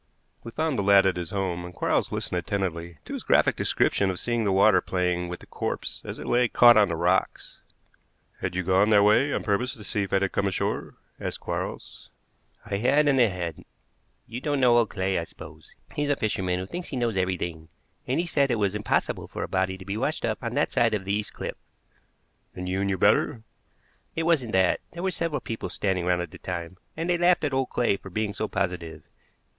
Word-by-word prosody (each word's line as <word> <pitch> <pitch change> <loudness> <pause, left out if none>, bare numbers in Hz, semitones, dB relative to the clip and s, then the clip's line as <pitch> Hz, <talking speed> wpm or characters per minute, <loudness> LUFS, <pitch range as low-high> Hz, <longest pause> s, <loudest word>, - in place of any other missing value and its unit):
We 115 - -7
found 155 +1 -1
the - - +2
lad 100 0 +6
at 95 - +2
his 90 -2 -3
home, 95 -3 -2
and 90 0 -9
Quarles - - 0
listened 90 - -2
attentively 85 -3 -3
to - - -7
his - - -4
graphic - - +3
description 100 - +1
of 95 - -3
seeing 120 -2 -1
the 100 - +2
water 100 +2 +5
playing 90 -1 -1
with 90 - -6
the - - -12
corpse - - -4
as - - -6
it - - -8
lay 120 0 +3
caught 120 +1 +7
on 105 -1 +6
the 85 - -1
rocks. - - 0 0.8
"Had - - -3
you 95 - 0
gone 95 +4 +3
that 105 -2 +6
way 110 +8 +4
on - - -1
purpose 120 +5 0
to 110 - -12
see 105 - -1
if 100 - -3
it 95 0 +2
had 95 - 0
come 100 - 0
ashore?" 95 - -2 0.2
asked - - -4
Quarles. - - -5 0.6
"I 100 - -2
had 140 +7 +3
and 135 -3 +4
I 120 - +6
hadn't. 85 -5 -5 0.6
You 120 +2 -7
don't 145 -1 0
know 120 -2 +5
old 115 -4 +1
Clay, 95 -1 -1
I - - -2
suppose. - - -13 0.2
He's 145 0 -1
a 145 - +3
fisherman 95 -6 -1
who 90 - -3
thinks 175 - -6
he 135 - -4
knows 120 -3 0
everything, 85 -4 -2 0.4
and 130 +5 +1
he 175 - 0
said 140 -4 +1
it 120 - +2
was 100 -3 0
impossible 105 0 -1
for - - -5
a - - -3
body 95 0 0
to 95 - -11
be 100 +2 -3
washed 140 +7 -1
up 110 -2 -2
on 120 +1 -3
that 145 - +1
side 115 -2 +3
of 95 -2 -4
the 100 - -1
east 105 0 -2
cliff." - - -5 1.0
"And 90 0 -5
you 95 +1 -1
knew 100 -1 0
better?" 110 +4 +2 0.7
"It 165 - -1
wasn't 150 -9 +1
that. 95 -1 +3
There 170 +1 -6
were 190 - +1
several 165 -4 -2
people 115 - -5
standing 95 -3 -1
round 90 -1 +2
at 85 - -9
the - - -12
time, 85 0 -5 0.2
and 165 +1 -2
they 175 -1 +1
laughed 175 -1 +4
at 145 -2 0
old 135 -1 0
Clay 120 -5 +1
for 95 - -11
being 105 +2 -2
so 110 - -2
positive. 90 -5 -3
100 Hz, 225 wpm, -26 LUFS, 95-120 Hz, 1.0 s, caught